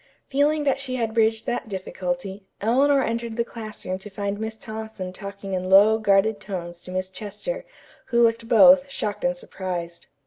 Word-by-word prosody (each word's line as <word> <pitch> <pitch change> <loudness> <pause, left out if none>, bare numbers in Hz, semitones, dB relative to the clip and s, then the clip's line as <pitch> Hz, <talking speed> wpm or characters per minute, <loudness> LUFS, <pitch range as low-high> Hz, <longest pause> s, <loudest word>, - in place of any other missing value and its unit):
Feeling 295 +2 +2
that 275 -2 +1
she 265 -2 -3
had 230 -3 -1
bridged 225 0 +2
that 240 -2 -3
difficulty, 190 0 -4
Eleanor 270 +5 +3
entered 230 0 -2
the 235 - +2
classroom 215 -5 -6
to 210 - -9
find 200 0 -3
Miss 220 0 -4
Thompson 220 -4 -7
talking 200 0 -7
in 185 0 -2
low, 205 +3 +7
guarded 205 0 +3
tones 175 -3 -6
to 180 - -8
Miss 185 0 -3
Chester, 225 - -5 0.4
who 235 -2 +3
looked 230 0 +2
both, 275 +4 +7
shocked 210 -6 -4
and 265 0 +1
surprised. 175 -7 -5
220 Hz, 170 wpm, -24 LUFS, 190-235 Hz, 0.4 s, low